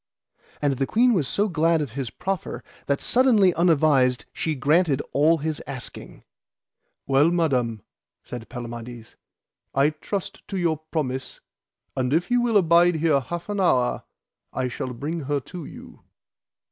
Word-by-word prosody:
And 140 -2 +1
the 135 - 0
queen 245 +2 +4
was 160 - +1
so 205 +8 +1
glad 165 -2 +2
of 145 -6 -3
his 130 -1 -4
proffer 190 - -4 0.2
that 140 0 0
suddenly 230 -8 +4
unadvised 150 -7 +3
she 160 -1 -2
granted 150 +1 +2
all 155 +4 +4
his 155 0 -3
asking. 135 -3 -7 0.8
Well, 140 +4 +4
Madam, 130 - 0 0.4
said 120 -2 -8
Palamides, 120 -1 -8 0.6
I 140 +3 +4
trust 180 +5 -5
to 195 - -4
your 170 -3 +1
promise, 130 -4 -3 0.6
and 130 0 0
if 175 +7 0
ye 245 - +4
will 240 -3 +3
abide 170 -1 +4
here 155 -3 +2
half 170 +6 -6
an 205 -1 -3
hour 125 -10 +2 0.5
I 130 -1 -2
shall 125 +1 -5
bring 150 +7 -4
her 145 +1 0
to 170 +4 -9
you. - - -12
155 Hz, 145 wpm, -24 LUFS, 130-175 Hz, 0.8 s, queen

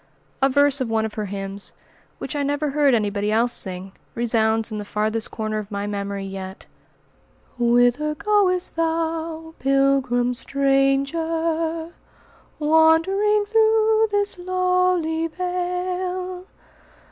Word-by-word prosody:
A 270 - +4
verse 285 0 +3
of 250 - -1
one 220 -1 +1
of 220 - -5
her 215 - -3
hymns, 195 0 -4 0.4
which - - -6
I 290 - -1
never 290 +1 -1
heard 285 -3 +3
anybody 205 -1 -1
else 235 +2 +3
sing, 185 -1 -4 0.2
resounds 225 -1 +1
in 215 - -4
the - - -4
farthest 215 +2 -1
corner 215 -1 -3
of 210 -1 -8
my 200 -1 -3
memory 200 -1 -4
yet:" 190 0 -8 0.9
"Whither 245 +5 +2
goest 380 -1 +1
thou, 325 0 -2
pilgrim 270 -2 +2
stranger, 320 +5 0 0.7
Wandering 330 +7 +3
through 440 0 +3
this 410 -2 -1
lowly 365 -3 +1
vale? 360 +1 -3
290 Hz, 115 wpm, -22 LUFS, 225-360 Hz, 0.9 s, A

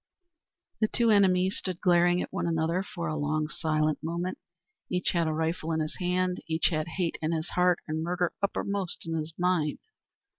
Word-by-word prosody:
The 215 - +3
two 230 +1 +2
enemies 190 -2 +4
stood 185 -2 -2
glaring 175 -1 +4
at - - -9
one - - -1
another 165 +2 +1
for 170 -3 -5
a 155 - -2
long 155 +1 0
silent 155 -1 0
moment. 170 +3 -3 0.5
Each 180 0 0
had 170 -2 +1
a - - +1
rifle 160 +1 -1
in 160 - 0
his 155 -1 -3
hand, 180 0 0
each 160 0 +2
had 155 0 -1
hate 175 -3 -1
in 160 +1 0
his 160 +1 -2
heart 180 -1 +3
and 155 0 -2
murder 175 +1 0
uppermost 200 -2 -2
in 165 0 -2
his 160 0 -4
mind. 175 -4 +1
170 Hz, 185 wpm, -28 LUFS, 160-180 Hz, 0.5 s, enemies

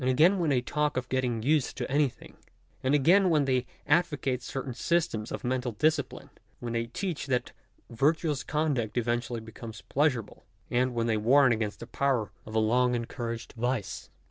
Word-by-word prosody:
again 160 +10 +4
when 165 -3 +1
they 130 -3 +2
talk 150 +2 -1
of 130 0 -2
getting 125 -4 0
used 150 +1 +1
to 125 - -2
anything: 145 -2 -1 0.5
and 130 +3 +2
again 180 +7 +5
when 150 -4 +3
they 130 -2 +1 0.2
advocate 145 -5 +1
certain 135 0 -5
systems 120 -4 0
of - - -5
mental 125 -1 -1
discipline 150 +3 0
— - - -38
when 120 -1 -4
they 115 0 -1
teach 160 +4 -4
that 125 -2 0 0.4
virtuous 145 +3 +1
conduct 145 -8 -1
eventually 120 0 -1
becomes 110 0 -10
pleasur 140 -4 +3
able, - - -18 0.3
and 125 0 +1
when 115 -1 +1
they 110 -2 +1
warn 130 +5 +5
against 110 -2 -2
the - - -5
power 125 -4 0 0.2
of 110 - -7
a - - +4
long 125 +3 +3
en 120 -1 -2
couraged 115 -1 -5
vice. 120 -3 -3
125 Hz, 180 wpm, -28 LUFS, 115-145 Hz, 0.5 s, again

